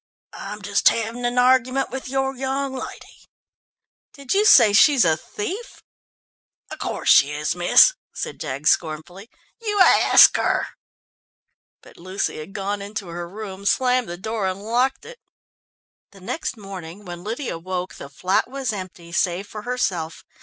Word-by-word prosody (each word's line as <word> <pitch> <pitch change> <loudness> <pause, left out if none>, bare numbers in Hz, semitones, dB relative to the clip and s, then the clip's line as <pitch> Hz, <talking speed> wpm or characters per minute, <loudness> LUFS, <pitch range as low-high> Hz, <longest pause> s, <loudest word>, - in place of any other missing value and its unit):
"I'm 205 +1 -8
just 200 +1 +3
having 230 +2 -3
an 240 +1 -1
argument 255 +1 +2
with 265 -1 -6
your 270 0 -1
young 270 +1 -3
lady." 260 - -10 0.8
"Do 280 -2 -14
you 415 +2 +3
say 235 - +7
she 285 +8 +6
is 245 - +4
a 160 -1 +3
thief?" 375 - -7 0.9
"Of - - -8
course - - -4
she 140 - +6
is, 150 +2 -2
miss," 175 - +6 0.2
said - - -6
Jaggs 140 +1 0
scornfully. 175 +6 -3 0.3
"You 415 -2 -2
ask 370 - +7
her!" - - 0 1.1
But - - -17
Lucy 185 +3 -3
had 155 +6 -10
gone 200 0 -3
into 200 -2 -6
her 170 0 -6
room, 200 -1 -8
slammed 250 +1 +1
the 175 - -6
door 220 +1 -3
and 190 +2 -4
locked 245 +4 0
it. 485 0 -12 0.9
The 195 - -15
next 260 - -4
morning 195 -1 -10
when 175 -1 -8
Lydia 225 - -4
woke, 185 +1 -5
the 140 - -10
flat 185 - -1
was 265 -4 -3
empty, 185 -3 -8
save 175 +2 0
for 210 0 -9
herself. 195 -9 -3
205 Hz, 155 wpm, -22 LUFS, 180-255 Hz, 1.1 s, say